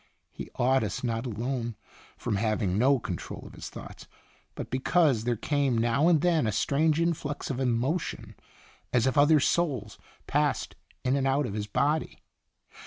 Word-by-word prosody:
He - - -8
awed 130 +2 +3
us - - -3
not 115 0 -1
alone 120 +1 -3 0.4
from 105 - -2
having 105 -3 0
no 135 +6 +4
con 90 -7 -4
trol - - -8
of - - -11
his - - -8
thoughts, - - -10 0.5
but - - -6
because 130 -2 +2
there 120 -1 +1
came 140 +1 0
now 120 +7 +2
and 165 -4 +4
then 165 -8 +2
a - - +1
strange 150 +8 +2
influx 155 -4 -1
of. 130 - -3
emotion 130 +6 -1 0.6
as 125 -1 +3
if 130 - +1
other 145 +1 +6
souls 135 -9 0 0.3
passed - - 0 0.3
in 130 +1 +2
and 135 -1 +1
out 135 +2 +2
of 100 - -4
his 105 0 -3
body. 150 +8 0
130 Hz, 170 wpm, -28 LUFS, 115-145 Hz, 0.6 s, other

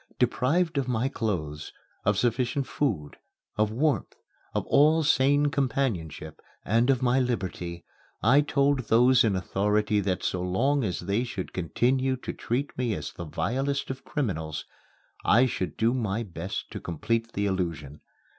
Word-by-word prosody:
Deprived 140 +6 +1
of 130 - -2
my 125 0 0
clothes, 80 - -3 0.3
of 105 0 +2
sufficient 125 +4 0
food, 90 - -2 0.4
of 105 0 +2
warmth, 140 +7 0 0.4
of - - 0
all 155 +3 +4
sane 145 0 +3
companionship 110 - -2 0.2
and 115 +5 +2
of 130 -2 +2
my 125 +1 +3
liberty, 90 -8 -3 0.4
I 135 +6 +6
told 140 -4 +1
those 125 +2 +5
in 105 -4 +2
authority 105 +3 +1
that 95 -2 -1
so 90 - -1
long 125 +11 +1
as 95 -5 -2
they 100 +6 0
should 95 -7 -5
continue 130 +9 +1
to 130 - -6
treat 130 +5 -3
me 120 -4 0
as - - -6
the 85 - -7
vilest 130 - -1
of 130 0 -8
criminals, 80 - -3 0.6
I 120 +4 +5
should 95 -7 -3
do 115 +2 +2
my 115 -3 -1
best 95 -1 -6
to - - -5
complete 115 +7 -2
the 100 - -1
illusion. 85 -7 -3
115 Hz, 150 wpm, -27 LUFS, 95-130 Hz, 0.6 s, I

